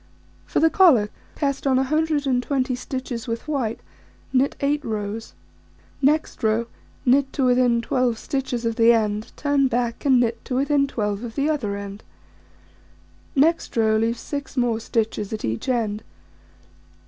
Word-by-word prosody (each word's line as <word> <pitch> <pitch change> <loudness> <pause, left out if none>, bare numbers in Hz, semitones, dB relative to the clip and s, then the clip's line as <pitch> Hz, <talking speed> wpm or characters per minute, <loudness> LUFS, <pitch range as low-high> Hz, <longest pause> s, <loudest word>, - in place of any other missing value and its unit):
For - - 0
the 325 0 +4
collar: 255 - +5 0.2
Cast 280 -2 -1
on 265 - +3
120 275 -2 +1
stitches 250 -1 -5
with 230 +4 -4
white, 255 -7 -1 0.5
knit 265 +2 +2
8 290 +1 0
rows. 215 0 -4 0.7
Next 300 +3 +1
row: 220 +1 +1 0.4
Knit 270 +2 +3
to 270 - +1
within 245 -2 +3
12 250 -2 +1
stitches 255 -2 -3
of 230 -1 -1
the 230 +1 +6
end, 215 -1 -1
turn 285 -2 +2
back, 240 -2 -2
and 265 -3 +4
knit 230 -1 0
to 255 - -3
within 280 +1 +2
12 210 -4 -2
of 230 -2 -7
the 290 +2 +1
other 210 -10 -2
end. 200 +1 -8 1.3
Next 315 -1 +2
row: 220 -1 +3
Leave 230 +2 0
6 285 +1 -6
more 240 -3 +1
stitches 220 -3 -2
at 215 - -3
each 115 - -3
end. 220 -4 0
245 Hz, 150 wpm, -23 LUFS, 225-275 Hz, 1.3 s, the